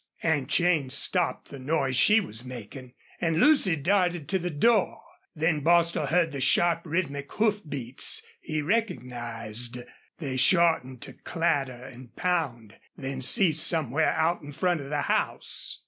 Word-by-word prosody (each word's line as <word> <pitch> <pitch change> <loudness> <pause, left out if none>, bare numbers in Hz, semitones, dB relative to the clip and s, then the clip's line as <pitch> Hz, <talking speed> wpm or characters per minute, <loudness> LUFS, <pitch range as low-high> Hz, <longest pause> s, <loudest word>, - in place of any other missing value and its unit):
Aunt 145 -5 0
Jane 160 -3 +2
stopped 170 +6 0
the 140 - -9
noise 135 -1 -1
she 210 - +5
was 120 - -7
making, 125 +1 -10 0.3
and 165 -1 0
Lucy 275 - +4
darted 175 0 0
to 190 - +1
the 180 0 -3
door. 200 +7 +1 0.4
Then 160 0 0
Bostil 170 -1 +2
heard 170 +1 +1
the 140 -1 -5
sharp, 170 +4 +3
rhythmic 145 -4 -3
hoof 210 -1 +1
beats 130 -2 0 0.2
he 155 -1 -4
recognized. 125 - -2 0.4
They 135 -5 -4
shortened 150 -5 +2
to - - -10
clatter 140 -7 -2
and 125 -1 -13
pound 135 - -2 0.2
then 135 -1 -5
ceased 160 - +4
somewhere 160 -2 +1
out 165 +2 0
in 145 0 -10
front 175 0 0
of 140 - -9
the 145 -1 -1
house. - - -2
155 Hz, 145 wpm, -26 LUFS, 130-175 Hz, 0.4 s, she